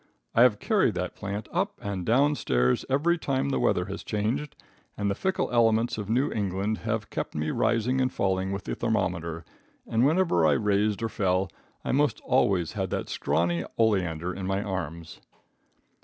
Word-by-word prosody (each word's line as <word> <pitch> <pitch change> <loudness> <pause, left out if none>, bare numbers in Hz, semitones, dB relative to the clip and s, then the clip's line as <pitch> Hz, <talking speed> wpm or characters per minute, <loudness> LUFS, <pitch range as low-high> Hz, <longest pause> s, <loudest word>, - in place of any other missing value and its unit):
I - - +4
have 120 -4 +6
carried - - +2
that - - -3
plant 105 +2 -5
up 195 +4 -1
and 100 -5 -4
down 135 +9 +3
stairs 65 - +1
every 165 +6 +2
time 135 -2 0
the 135 - 0
weather - - +2
has - - -6
changed, 115 +8 -2 0.4
and 100 -1 0
the - - +1
fickle 190 - -1
elements 115 -1 +3
of 105 -1 -5
New 130 +6 +2
England 100 +1 -1
have 115 -2 -3
kept - - -4
me 75 0 -1
rising 120 +2 +1
and 130 0 +1
falling 95 0 0
with 100 0 -4
the - - -4
thermometer, 85 -6 -2 0.4
and 115 +1 +1
whenever 155 - +3
I 75 - +4
raised 105 +4 +1
or 115 - 0
fell 95 -3 0 0.4
I - - 0
most 145 +2 +2
always 95 -10 +2
had 95 -4 -3
that - - -3
scrawny 85 0 0
oleander 90 -6 +1
in 95 0 -5
my 95 +1 0
arms. 85 -5 -5
105 Hz, 175 wpm, -27 LUFS, 95-125 Hz, 0.4 s, have